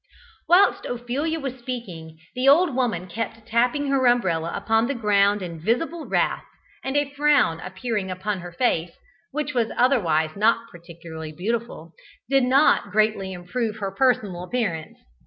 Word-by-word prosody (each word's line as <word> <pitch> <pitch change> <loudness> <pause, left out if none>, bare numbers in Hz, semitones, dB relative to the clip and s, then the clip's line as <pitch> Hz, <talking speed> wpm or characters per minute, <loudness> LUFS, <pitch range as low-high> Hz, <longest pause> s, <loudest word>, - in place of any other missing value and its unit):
Whilst 360 +3 +5
Ophelia 255 +7 -2
was 265 -3 -5
speaking, 185 -11 -7 0.2
the 255 +2 +3
old 325 +1 +5
woman 230 -9 0
kept 225 +3 -5
tapping 240 +6 +1
her 265 -2 +3
umbrella 175 -9 +1
upon 225 +1 +1
the 280 - -2
ground 205 -3 +2
in 170 -2 -6
visible 310 - -1
wrath, - - 0 0.4
and 265 +2 -1
a 290 -1 0
frown 290 - +3
appearing 190 +2 -4
upon 190 +2 -3
her 175 0 -8
face, 170 -4 0 0.4
which 295 +1 -3
was 235 -3 +1
otherwise 165 - +2
not 230 +3 +1
particularly 165 -2 -9
beautiful, 200 -3 -4 0.3
did 270 0 +3
not 270 +4 +4
greatly 215 -3 +1
improve 210 +5 -3
her 200 -3 -4
personal 210 -5 +1
appearance. 180 -6 -3
225 Hz, 145 wpm, -24 LUFS, 180-255 Hz, 0.4 s, Whilst